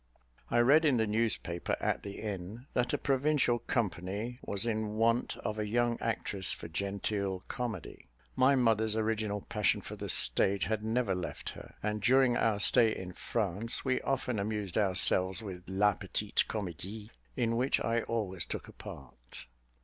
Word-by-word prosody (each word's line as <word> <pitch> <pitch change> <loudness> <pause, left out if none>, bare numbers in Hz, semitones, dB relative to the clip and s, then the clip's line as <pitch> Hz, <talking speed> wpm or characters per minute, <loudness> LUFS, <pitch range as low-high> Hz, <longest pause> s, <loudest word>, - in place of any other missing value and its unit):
I - - +1
read 140 +7 +6
in 145 -5 +4
the 110 - +2
newspaper, 105 -6 -1
at - - 0
the 100 -1 -7
inn, 105 +3 -5
that 125 -1 +1
a - - +1
provincial 135 -3 +2
company 105 +2 -2
was 100 +2 -2
in 110 -2 -1
want 115 +2 +1
of 110 0 -4
a 105 - -1
young 120 +2 +1
actress 100 -4 +1
for 85 - -7
genteel 100 +1 -2
comedy. 115 -8 -5 0.3
My 135 +2 +5
mother's 110 -3 +2
original 110 -2 -1
passion 105 -1 +1
for - - -8
the - - -6
stage 100 0 +2
had 110 -1 -1
never 110 -1 0
left 90 -2 -4
her; - - -11
and, 105 0 -1
during 130 +2 +4
our 110 -3 +2
stay 110 +1 +5
in 90 -1 -7
France, 110 +4 -2
we 130 -1 +1
often 125 -4 -1
amused 105 -2 -3
ourselves 95 0 +4
with 95 -4 -6
la 100 +2 +3
petite - - -1
comédie, 105 +2 -5 0.3
in 115 -2 +1
which 130 +3 +2
I 115 0 0
always 100 -7 -2
took - - -5
a - - -12
part. - - -11
110 Hz, 165 wpm, -31 LUFS, 100-120 Hz, 0.3 s, read